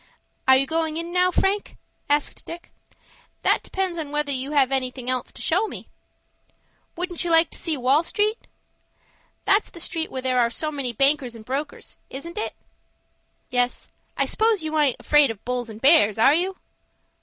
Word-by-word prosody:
"Are 265 0 +8
you 270 - +2
goin' 320 +2 -1
in 335 +1 -4
now, 365 0 +4
Frank?" 390 +3 -1 0.3
asked 290 0 0
Dick. 340 +1 -9 0.7
"That - - +3
depends 375 -3 -3
upon 295 -3 -5
whether 295 -1 0
you 270 +2 -2
have 275 -3 +3
anything 255 -1 -1
else 255 -1 -3
to - - -8
show 375 +7 +2
me." - - -9 1.1
"Wouldn't 355 0 -2
you 350 - -2
like 330 0 +5
to - - -4
go - - -9
to - - -7
Wall 270 +5 +4
Street?" 420 +6 0 1.1
"That's 405 +2 +3
the 340 - -12
street 330 -1 -3
where 260 -1 -6
there 255 -1 +1
are 235 -1 +3
so 305 +6 -4
many 275 -4 -2
bankers 275 0 +2
and 220 -1 -12
brokers,—isn't 285 - -6
it?" - - -3 1.0
"Yes, 245 0 -1 0.3
I - - +2
s'pose 440 -5 +1
you 315 0 -3
aint 280 -5 +3
afraid 295 -3 +4
of 220 -2 -7
bulls 245 -1 -2
and 215 -1 -9
bears,—are 265 -3 +5
you?" 365 +4 +1
295 Hz, 175 wpm, -23 LUFS, 255-340 Hz, 1.1 s, Are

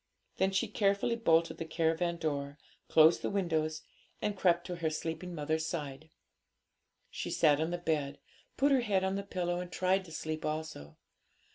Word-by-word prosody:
Then 190 - +3
she 190 0 0
carefully 200 +3 +1
bolted 165 -7 +2
the - - -2
caravan 165 +1 0
door, 145 -3 -3 0.3
closed 160 +1 +6
the - - -1
windows, 160 -5 -1 0.4
and 210 - -1
crept 175 -2 +2
to 180 -1 -5
her 165 -2 0
sleeping 165 +3 -4
mother's 155 +1 -1
side. 150 -2 -5 1.0
She - - -4
sat 145 -1 +4
on 160 - 0
the 175 - -2
bed, 150 -5 -1 0.4
put 280 +2 +3
her 265 -2 +4
head 200 -5 +1
on 190 0 0
the 200 - -1
pillow, 180 -3 -2
and 180 0 -6
tried 185 +1 +1
to 165 - -12
sleep 155 0 -4
also. 155 - -5
165 Hz, 170 wpm, -32 LUFS, 155-185 Hz, 1.0 s, closed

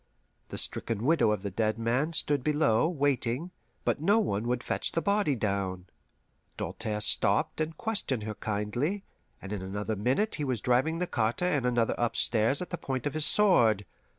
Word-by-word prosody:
The - - -6
stricken 115 -2 -1
widow 160 -6 +3
of 105 -2 -1
the 100 - -3
dead 110 +3 0
man 125 +8 0
stood 145 -4 +2
below, 150 -3 +2
waiting, 145 0 -1 0.3
but - - 0
no 200 +7 +4
one 115 - 0
would 125 0 -1
fetch - - -1
the - - +1
body 200 -8 +1
down. 100 -4 -2 0.7
Doltaire 110 -1 -3
stopped 105 +9 +3
and 155 0 -3
questioned 200 - -2
her 110 0 -4
kindly, 110 - -2 0.4
and 100 +1 -6
in 100 - -4
another 105 +3 -3
minute 130 - 0
he - - 0
was 130 -5 -1
driving 130 +9 +1
the 180 - 0
carter 120 +2 -1
and 145 -8 +1
another 120 -2 +1
upstairs 120 +4 +2
at - - -11
the 175 - -4
point 130 -2 -4
of 145 - -1
his 155 0 +3
sword. 115 - +3
125 Hz, 180 wpm, -29 LUFS, 110-155 Hz, 0.7 s, no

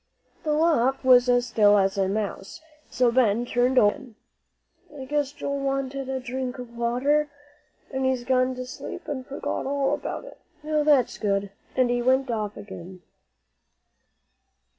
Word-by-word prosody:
The 305 -2 0
loft 275 -5 +2
was 250 -1 +6
as 245 0 +3
still 210 -4 +4
as 195 -1 +2
a 195 -1 +1
mouse, 200 +2 -4 0.3
so 245 -1 +2
Ben 235 -2 +2
turned 245 +2 +1
over 205 -3 +6
again. 240 -4 -14 0.8
"I 265 - -6
guess 290 0 -1
Joel 280 -1 -4
wanted 275 -1 -2
a 265 0 -2
drink 255 0 -4
of 245 -2 -9
water, 265 +6 +1 0.6
and 265 -1 -2
he's 260 -2 0
gone 255 0 +1
to 255 0 -5
sleep 250 - -8
and 270 -3 -4
forgot 270 0 -4
all 280 0 0
about - - -4
it. - - -13 0.2
Now, 305 0 0
that's 285 -5 +3
good," 200 -2 -1 0.2
and 255 -2 +2
off - - +2
he 245 - 0
went 260 +1 +2 0.3
again. 190 -3 -10
255 Hz, 160 wpm, -25 LUFS, 235-270 Hz, 0.8 s, was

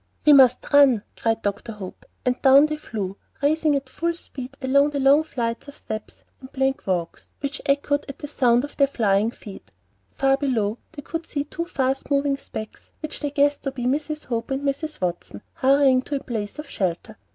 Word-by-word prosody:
"We 300 - +8
must 260 0 +5
run," 270 -7 +6
cried 225 0 -1
Dr. 205 +3 -3
Hope, 195 -3 -10 0.2
and 250 0 0
down 275 +2 +7
they 305 0 -2
flew, 200 -9 -5 0.3
racing 310 0 +3
at 275 -1 -2
full 335 +5 -2
speed 270 -4 -9
along 280 +2 +3
the 290 -1 -3
long 275 +3 +5
flights 235 -5 -3
of 285 - -11
steps 215 0 -7
and 260 - -11
the - - -37
plank 270 -3 -1
walks, 175 -3 -2
which 285 +1 -4
echoed 285 +1 +1
to 275 - -7
the 295 - -7
sound 245 -4 +3
of 290 - -7
their 280 - +5
flying 215 -5 +1
feet. 210 -4 -11 0.4
Far 270 0 +2
below 235 -6 -1
they 290 -3 -8
could 330 +2 -5
see 285 -1 -2
two 335 +3 -5
fast 270 -6 -1
moving 280 -1 +1
specks 215 -5 -9
which 310 0 -6
they 290 - -2
guessed 285 0 +2
to 275 - -3
be 250 -2 -5
Mrs. 300 +3 -1
Hope 230 -2 -3
and 270 +1 -2
Mrs. 300 +2 -2
Watson, 175 - -4
hurrying 270 -1 +4
to 285 - -4
a 275 - -3
place 210 -4 -4
of 300 - -7
shelter. 190 +3 -3
270 Hz, 200 wpm, -23 LUFS, 230-285 Hz, 0.4 s, We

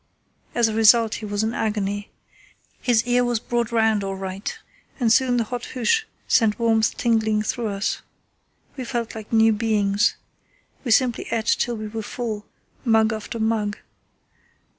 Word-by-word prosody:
As 235 -1 +4
a 220 - -2
result 225 0 +5
he - - -5
was 205 +1 -1
in 220 +1 -1
agony. 205 -2 -2 0.7
His 235 -2 +2
ear 245 0 +3
was 240 -2 0
brought 235 0 -2
round 220 -3 +2
all 195 0 -3
right, 190 +1 -5 0.4
and 230 -3 +4
soon 250 -1 +3
the 235 - +2
hot 245 +2 -5
hoosh 440 - +2 0.2
sent 220 -3 +3
warmth 225 -2 +2
tingling 220 -2 +1
through 230 +1 -2
us. 200 0 -2 0.7
We 260 - -5
felt 235 -2 -3
like 220 -1 -9
new 225 -1 +5
beings. 210 -2 +1 0.7
We 255 - -4
simply 240 +1 +2
ate 225 -1 -1
till 235 0 +1
we 215 0 -5
were 220 +1 -5
full, 215 -1 -5 0.4
mug 220 -3 +3
after 220 +2 -5
mug. 220 -2 0
225 Hz, 160 wpm, -23 LUFS, 210-235 Hz, 0.7 s, result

